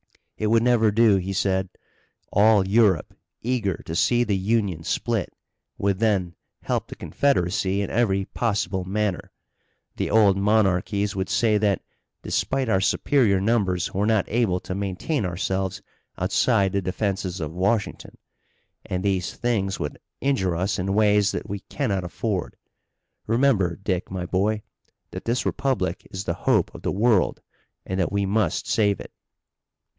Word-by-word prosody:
"It 110 - -2
would 115 +1 +3
never 120 -3 +4
do," 110 -1 +4
he 95 +1 -3
said. 95 -1 0 0.6
"All 105 -1 +5
Europe, 100 -5 +2 0.3
eager 110 -8 -1
to 80 - -5
see 120 +6 +3
the 105 -4 0
Union 95 -4 0
split, - - -1 0.5
would 100 -1 0
then 100 -6 +1 0.3
help - - -1
the - - -9
Confederacy 100 -6 0
in - - -5
every 100 -5 +1
possible 100 -5 -1
manner. 100 0 -2 0.7
The - - -1
old 105 -3 +4
monarchies 100 -1 +1
would 95 -1 -2
say 110 -3 +2
that 100 -2 +1 0.4
despite 135 -1 -1
our 95 -4 +2
superior 105 -1 +2
numbers 95 -4 0
we're 100 +2 0
not 110 -3 +2
able 110 -6 +1
to - - -5
maintain 100 - -2
ourselves 95 +1 -2 0.3
outside 95 -1 +2
the 100 0 0
defenses 95 0 -2
of 80 -1 -4
Washington. 100 +4 -1 0.7
And 90 0 -3
these 95 -3 -1
things 105 -5 -1
would 75 - -4 0.2
injure 110 -11 0
us 95 +4 -1
in 95 +2 -1
ways 105 -1 +4
that - - -4
we 100 +1 -4
cannot 100 -6 -2
afford. 95 +2 -3 0.7
Remember, 115 -7 +2
Dick, 95 -2 -3
my 95 -2 -4
boy, 105 +4 0 0.5
that - - -7
this 120 +2 0
republic 115 -11 -1
is 95 +1 -5
the 85 - -1 0.2
hope - - +2
of - - -10
the - - -1
world, 105 -1 +2 0.5
and 95 0 -3
that 90 - 0
we 100 0 0
must 100 -3 0
save 100 -3 +2
it." - - -10
100 Hz, 150 wpm, -24 LUFS, 95-110 Hz, 0.7 s, All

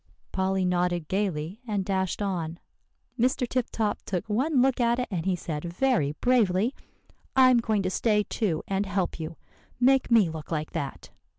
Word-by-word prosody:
Polly 190 0 0
nodded 175 -2 0
gayly 190 -1 -2
and 205 -3 -1
dashed 190 +1 -1
on. 170 -4 -2 0.6
"Mr. 250 +1 +2
Tip 250 0 -1
Top 215 -2 -1
took 180 0 -3
one 260 +7 +1
look 260 0 +3
at 235 0 +3
it, 250 - -1
and 175 -2 -2
he 185 - +2
said 155 -3 -5
very 175 - +1
bravely, 225 - +2 0.6
'I'm 255 -2 +6
going 220 -3 0
to 185 - -1
stay 210 +1 +2
too, 195 -7 -1
and 195 +1 -1
help 190 -3 -1
you. 160 0 -5 0.4
Make 265 +1 +4
me 225 -6 +5
look 160 -1 -7
like 155 -1 -2
that. 140 -1 -5
195 Hz, 170 wpm, -27 LUFS, 175-235 Hz, 0.6 s, I'm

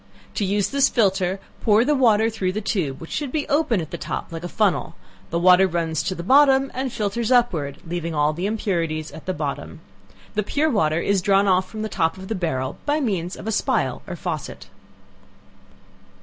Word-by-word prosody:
To - - -1
use 200 +1 +1
this 280 0 +3
filter 195 -4 +1 0.2
pour 220 +2 +4
the 300 - +3
water 225 -5 +3
through 190 -4 -2
the 210 - -2
tube, 175 -10 -2
(which 165 - -10
should 290 -4 -3
be 295 0 -2
open 285 - +1
at 160 - -8
the 170 - -5
top - - -5
like 165 0 -6
a - - -3
funnel;) 210 -1 0 0.3
the 170 - -1
water 180 +2 +6
runs 165 -3 -1
to 185 +4 -2
the 170 - -6
bottom, 270 +3 +5
and 260 0 -3
filters 220 +3 -2
upward, 180 - +2
leaving 170 -1 -4
all 150 +1 +2
the 175 +5 -2
impurities 170 -8 -2
at 160 - -12
the 185 - 0
bottom. - - -5 0.5
The 210 - +1
pure 295 +9 0
water 160 -8 +1
is 200 +1 +1
drawn 200 +1 +3
off 185 -1 +2
from 215 -1 -5
the - - -1
top 165 -4 0
of 190 0 -9
the - - 0
barrel 145 -9 -2
by 295 +1 +2
means 190 - -2
of - - -10
a 220 - -1
spile 220 - 0
or - - -5
faucet. - - -5
195 Hz, 205 wpm, -22 LUFS, 170-225 Hz, 0.5 s, water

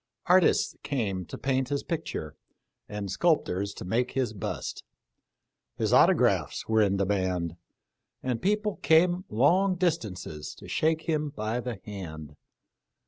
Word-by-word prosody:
Artists 180 -1 +4
came 100 -10 -2
to - - -7
paint 130 -1 0
his 140 -1 -1
picture, 160 - -4 0.5
and 105 -2 -4
sculptors 100 - +1
to - - -7
make 120 +7 0
his 125 -4 0
bust. 100 - -5 0.9
His - - 0
auto - - +7
graphs - - +1
were 110 0 +3
in 100 -2 +2
demand, 95 -4 0 0.7
and 125 -3 -1
people 210 +1 0
came 175 +3 +3
long 180 - +3
dis 175 -2 +2
tances 90 -7 -7
to - - -12
shake 160 0 +1
him 155 -3 0
by 110 -3 -3
the 120 -5 -5
hand. 80 -7 -7
120 Hz, 140 wpm, -28 LUFS, 95-160 Hz, 0.9 s, auto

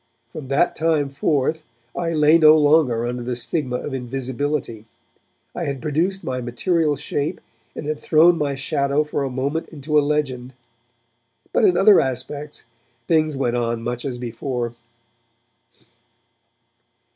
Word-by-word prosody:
From 150 -4 -8
that 140 +6 +1
time 155 -3 +1
forth 145 +2 0 0.3
I 170 -1 -2
lay 155 +1 +4
no 155 0 +7
longer 145 -6 +3
under 120 0 -3
the 125 +1 -3
stigma 125 +1 -2
of 135 +3 -4
invisibility; 130 -2 -3 0.7
I - - -4
had 140 -2 -3
produced 165 +6 -1
my 125 -1 -3
material 150 +6 0
shape 145 +1 -3 0.4
and - - -6
had 150 0 -3
thrown 170 +2 +5
my 145 -3 -1
shadow 140 +2 0
for 150 -1 -3
a 135 - -2
moment 140 +5 -3
into 150 0 0
a - - +3
legend. 135 -4 -2 1.0
But, - - +3
in 375 - +4
other 210 +1 +7
respects, 140 +1 -1 0.4
things 155 -3 +2
went 125 -3 0
on 115 -1 -2
much 120 +1 -3
as 130 -3 -4
before. 120 0 -4
140 Hz, 140 wpm, -21 LUFS, 125-155 Hz, 1.0 s, no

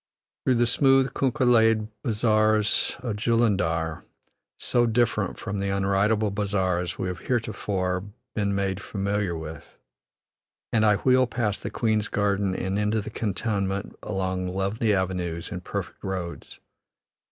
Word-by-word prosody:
Through 130 - +3
the 120 0 +3
smooth 135 +2 +3
kunkah 135 0 +1
laid 115 -3 +4
bazaars 110 -2 +2
of 115 -5 -2
Jullundar, 100 -8 +1 0.6
so 120 -1 +2
different 115 0 +1
from 100 0 -4
the 100 0 -1
unridable 100 +2 +2
bazaars 95 -3 -1
we 95 - -2
have 90 -1 -4
heretofore 100 -6 -1 0.3
been 100 -2 0
made 100 0 -1
familiar 100 -3 -2
with, 80 -1 -9 1.0
and 110 -2 +4
I 105 -1 +5
wheel 130 +3 +3
past 110 -3 -1
the - - -4
Queen's 110 -2 0
Gardens 100 -2 0
and 95 +2 -1
into 105 +1 +1
the 105 +1 -6
cantonment 100 -2 -2
along 95 -2 -2
lovely 100 +4 0
avenues 90 -3 -1
and 90 -2 -5
perfect - - -5
roads. 90 -3 -5
100 Hz, 130 wpm, -26 LUFS, 95-110 Hz, 1.0 s, I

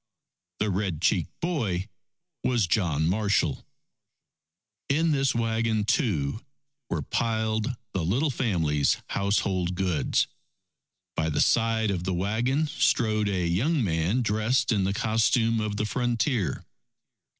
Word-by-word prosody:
The 105 -1 0
red 95 -4 -1
cheeked 85 -1 0
boy 110 - -1 0.6
was 120 -5 +2
John 85 -5 +1
Marshall. 100 +2 +1 1.3
In 160 +4 +2
this 135 -3 +1
wagon, 115 -1 0
too, 105 - 0 0.5
were 80 -4 -2
piled 110 - -1 0.2
the 95 - -1
little 130 - +1
family's 80 - +1
household 95 -3 0
goods. 90 -5 +1 0.9
By 80 - 0
the 75 - -1
side 115 -2 +2
of 90 -3 -2
the 95 0 -1
wagon, 115 - 0
strode 110 -7 +1
a 90 -3 0
young 125 - +1
man 90 +6 0
dressed 110 +4 +1
in 100 -4 +2
the 100 - 0
costume 115 +2 +2
of 105 -1 -2
the 105 - 0
frontier. 120 - -1
105 Hz, 120 wpm, -26 LUFS, 90-115 Hz, 1.3 s, was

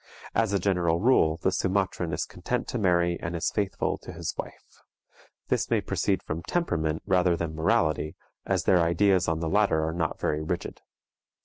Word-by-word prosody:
As 110 -3 +1
a 100 - +2
general 90 -3 +1
rule, 85 -8 +3
the 95 +3 0
Sumatran 95 -2 0
is 80 +3 -1
content 115 +9 -3
to 125 - -2
marry, 85 -3 +2
and 85 +1 -4
is 80 - -1
faithful 100 -2 -1
to - - -9
his - - -4
wife. - - -9 0.7
This - - 0
may - - +3
proceed - - -1
from 80 +1 -4
temperament 80 - -1
rather 90 -2 +3
than 85 -1 -3
morality, 80 -3 +1 0.3
as - - 0
their 90 -2 +4
ideas 90 +3 +3
on 80 0 0
the 80 - -1
latter 80 -4 +2
are 80 - -2
not 80 -2 -2
very 75 0 -1
rigid. 80 - -4
85 Hz, 180 wpm, -27 LUFS, 80-95 Hz, 0.7 s, their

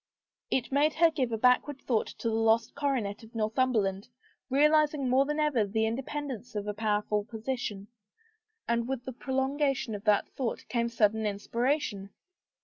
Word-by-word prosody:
It 255 0 -1
made 295 +3 +3
her 335 0 +5
give 265 -6 -1
a 225 - 0
backward 250 +4 +3
thought 235 -5 0
to - - -3
the 225 - 0
lost 225 0 +2
coronet 260 -8 -1
of 225 +1 -15
Northum 225 +4 +1
berland, 195 -3 0 0.4
realizing 300 0 +3
more 260 +2 +4
than 295 +1 -2
ever 295 -7 +2
the 220 +2 0
independence 250 0 -4
of 205 -1 -2
a 210 - -2
powerful 210 -1 0
position, 220 -2 -4 0.8
and 235 0 0
with 260 -2 -3
the 260 - -5
prolongation 265 -1 -1
of 205 -1 -6
that 210 -2 +3
thought 250 -4 -4
came 235 -1 0
sudden 220 -1 +2
inspiration. 210 0 -1
235 Hz, 160 wpm, -29 LUFS, 215-270 Hz, 0.8 s, her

